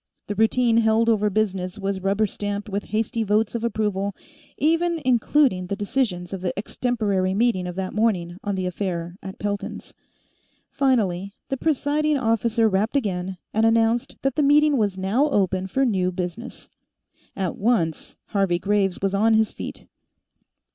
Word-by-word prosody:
The 205 Hz, -, -3 dB
routine 225 Hz, +2 st, +3 dB
held 225 Hz, 0 st, +3 dB
over 210 Hz, -2 st, +3 dB
business 190 Hz, -2 st, -1 dB
was 195 Hz, -1 st, -2 dB
rubber 200 Hz, +3 st, +1 dB
stamped 205 Hz, 0 st, -4 dB
with 200 Hz, 0 st, -3 dB
hasty 225 Hz, +2 st, -1 dB
votes 215 Hz, +1 st, +1 dB
of 235 Hz, -1 st, -3 dB
approval, 205 Hz, -4 st, -1 dB, 0.4 s
even 330 Hz, +2 st, +1 dB
including 245 Hz, -5 st, +2 dB
the 200 Hz, -, -2 dB
decisions 200 Hz, -4 st, -2 dB
of 190 Hz, -, -4 dB
the 180 Hz, 0 st, -3 dB
extemporary 200 Hz, -4 st, -1 dB
meeting 205 Hz, -5 st, +1 dB
of 180 Hz, -, -6 dB
that 190 Hz, 0 st, -3 dB
morning 185 Hz, -6 st, 0 dB
on 205 Hz, -1 st, -1 dB
the 185 Hz, -1 st, -2 dB
affair 175 Hz, -2 st, -3 dB
at 190 Hz, 0 st, -8 dB
Pelton's. 205 Hz, -1 st, -4 dB, 0.8 s
Finally, 200 Hz, -8 st, +1 dB, 0.2 s
the 270 Hz, -, 0 dB
presiding 300 Hz, +1 st, +1 dB
officer 230 Hz, -2 st, +2 dB
rapped 210 Hz, +5 st, 0 dB
again 190 Hz, -6 st, -2 dB, 0.2 s
and 220 Hz, -, +2 dB
announced 225 Hz, +1 st, +2 dB
that 270 Hz, -1 st, +1 dB
the 305 Hz, -, +2 dB
meeting 295 Hz, +1 st, +5 dB
was 205 Hz, -6 st, 0 dB
now 215 Hz, +11 st, +1 dB
open 190 Hz, -6 st, +1 dB
for 270 Hz, +8 st, +1 dB
new 185 Hz, -6 st, +1 dB
business. 180 Hz, +5 st, -6 dB, 0.6 s
At 190 Hz, -4 st, -2 dB
once, 195 Hz, -8 st, 0 dB
Harvey 195 Hz, -4 st, +1 dB
Graves 195 Hz, 0 st, 0 dB
was 195 Hz, 0 st, +1 dB
on 220 Hz, +3 st, +3 dB
his 220 Hz, -1 st, +2 dB
feet. -, -, -7 dB
205 Hz, 155 wpm, -23 LUFS, 190-230 Hz, 0.8 s, meeting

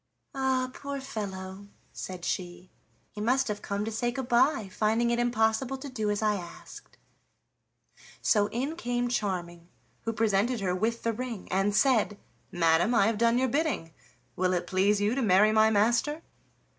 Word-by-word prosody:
"Ah! 260 Hz, -2 st, 0 dB
poor 280 Hz, 0 st, -5 dB
fellow," 200 Hz, -6 st, -6 dB, 0.3 s
said 180 Hz, -2 st, -7 dB
she, 175 Hz, 0 st, -4 dB, 0.4 s
"he 210 Hz, -, -7 dB
must 260 Hz, +5 st, +2 dB
have 210 Hz, 0 st, -3 dB
come 200 Hz, +1 st, -3 dB
to 225 Hz, -, -3 dB
say 240 Hz, +2 st, -1 dB
good 245 Hz, +1 st, -4 dB
by, 240 Hz, -1 st, +3 dB
finding 220 Hz, +5 st, +1 dB
it 235 Hz, -, +1 dB
impossible 240 Hz, +2 st, +1 dB
to 275 Hz, +2 st, -8 dB
do 220 Hz, -5 st, -2 dB
as 205 Hz, +1 st, -1 dB
I 210 Hz, -1 st, +2 dB
asked." 175 Hz, -2 st, -11 dB, 1.2 s
So 205 Hz, -2 st, +3 dB
in 270 Hz, +9 st, -3 dB
came 245 Hz, -4 st, -1 dB
Charming, 175 Hz, -6 st, -3 dB, 0.4 s
who 225 Hz, -, 0 dB
presented 225 Hz, +2 st, +1 dB
her 185 Hz, -3 st, -1 dB
with 225 Hz, +5 st, -1 dB
the 230 Hz, -, 0 dB
ring 235 Hz, -3 st, -5 dB
and 195 Hz, +2 st, +1 dB
said: 225 Hz, -5 st, +3 dB, 0.3 s
"Madam, 170 Hz, +6 st, +3 dB
I 200 Hz, -, +5 dB
have 220 Hz, -1 st, 0 dB
done 235 Hz, +1 st, +3 dB
your 260 Hz, +1 st, +2 dB
bidding. 275 Hz, -, -1 dB, 0.4 s
Will 185 Hz, 0 st, +1 dB
it 175 Hz, -1 st, -1 dB
please 195 Hz, +3 st, +2 dB
you 205 Hz, +2 st, +1 dB
to 270 Hz, -, -1 dB
marry 210 Hz, -1 st, +5 dB
my 220 Hz, 0 st, +5 dB
master?" 235 Hz, +9 st, +1 dB
220 Hz, 170 wpm, -28 LUFS, 195-245 Hz, 1.2 s, I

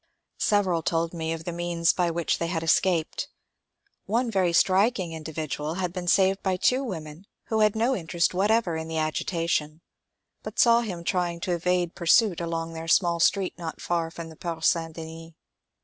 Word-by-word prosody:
Several 190 Hz, -5 st, +2 dB
told 165 Hz, +1 st, -1 dB
me 160 Hz, -1 st, -3 dB
of 165 Hz, 0 st, -4 dB
the 175 Hz, -, -4 dB
means 170 Hz, -1 st, +1 dB
by 175 Hz, -2 st, +1 dB
which 170 Hz, 0 st, -1 dB
they 170 Hz, -, -1 dB
had 165 Hz, -1 st, -2 dB
escaped. 165 Hz, 0 st, +1 dB, 0.8 s
One 230 Hz, +3 st, 0 dB
very 185 Hz, -4 st, +2 dB
striking 190 Hz, 0 st, +2 dB
individual 155 Hz, -1 st, -4 dB
had 180 Hz, -2 st, -2 dB
been 180 Hz, -1 st, -5 dB
saved 195 Hz, +2 st, +3 dB
by 190 Hz, -2 st, 0 dB
two 255 Hz, +8 st, +2 dB
women 165 Hz, -, -7 dB, 0.2 s
who 220 Hz, -, +1 dB
had 215 Hz, -1 st, +3 dB
no 235 Hz, +4 st, +2 dB
interest 170 Hz, -2 st, 0 dB
whatever 200 Hz, -1 st, +2 dB
in 160 Hz, 0 st, -4 dB
the 160 Hz, 0 st, -4 dB
agitation, 155 Hz, 0 st, -1 dB, 0.6 s
but -, -, -8 dB
saw 235 Hz, 0 st, +5 dB
him 185 Hz, -7 st, -5 dB
trying 175 Hz, -1 st, -1 dB
to 185 Hz, -, -2 dB
evade 175 Hz, 0 st, 0 dB
pursuit 175 Hz, +1 st, +3 dB
along 165 Hz, -1 st, -3 dB
their 165 Hz, 0 st, -7 dB
small 170 Hz, 0 st, +3 dB
street 190 Hz, +2 st, +2 dB
not 165 Hz, -2 st, -6 dB
far 170 Hz, -2 st, -1 dB
from 165 Hz, 0 st, -8 dB
the 160 Hz, -, -12 dB
Porte 165 Hz, -1 st, -4 dB
St. 165 Hz, -1 st, +2 dB
Denis. 165 Hz, 0 st, -9 dB
170 Hz, 180 wpm, -26 LUFS, 165-190 Hz, 0.8 s, saw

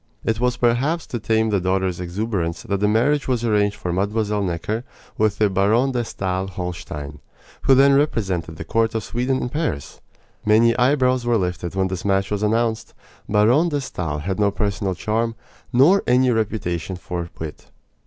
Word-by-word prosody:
It 110 Hz, 0 st, 0 dB
was 125 Hz, 0 st, +1 dB
perhaps 130 Hz, +8 st, +1 dB
to 120 Hz, -, -4 dB
tame 110 Hz, 0 st, +1 dB
the 100 Hz, -, +2 dB
daughter's 95 Hz, -1 st, 0 dB
exuberance 90 Hz, -2 st, -3 dB
that 100 Hz, -1 st, -2 dB
a 105 Hz, -, +3 dB
marriage 125 Hz, +7 st, +2 dB
was 120 Hz, -3 st, 0 dB
arranged 105 Hz, -2 st, +2 dB
for 90 Hz, -, -4 dB
Mlle. 105 Hz, +2 st, 0 dB
Necker 100 Hz, +5 st, -2 dB, 0.3 s
with 110 Hz, -1 st, +1 dB
the 105 Hz, -, +3 dB
Baron 105 Hz, +7 st, +2 dB
de 120 Hz, -2 st, -1 dB
Stael 95 Hz, -3 st, -3 dB
Holstein, 85 Hz, -6 st, -6 dB, 0.4 s
who 135 Hz, -, +5 dB
then 140 Hz, +1 st, +6 dB
represented 95 Hz, -, 0 dB
the 80 Hz, -, -6 dB
court 115 Hz, +5 st, 0 dB
of 110 Hz, -, -1 dB
Sweden 125 Hz, +4 st, -1 dB
at 125 Hz, -, -4 dB
Paris. 150 Hz, -, -3 dB, 0.4 s
Many 115 Hz, +2 st, +4 dB
eyebrows 130 Hz, 0 st, +2 dB
were 120 Hz, -1 st, +3 dB
lifted 90 Hz, -2 st, -3 dB
when 95 Hz, 0 st, +1 dB
this 95 Hz, -1 st, -5 dB
match 95 Hz, 0 st, +1 dB
was 105 Hz, -1 st, -1 dB
announced. 115 Hz, +1 st, 0 dB, 0.3 s
Baron 115 Hz, +11 st, +4 dB
de 145 Hz, -2 st, -1 dB
Stael 85 Hz, -, -4 dB
had 95 Hz, +7 st, -3 dB
no 105 Hz, -1 st, +4 dB
personal 100 Hz, -2 st, -2 dB
charm, 115 Hz, +4 st, -1 dB, 0.4 s
nor 145 Hz, +11 st, +5 dB
any 125 Hz, +1 st, +4 dB
reputation 95 Hz, -6 st, -2 dB
for 85 Hz, -1 st, -5 dB
wit. 80 Hz, -2 st, -7 dB
105 Hz, 175 wpm, -22 LUFS, 95-120 Hz, 0.4 s, then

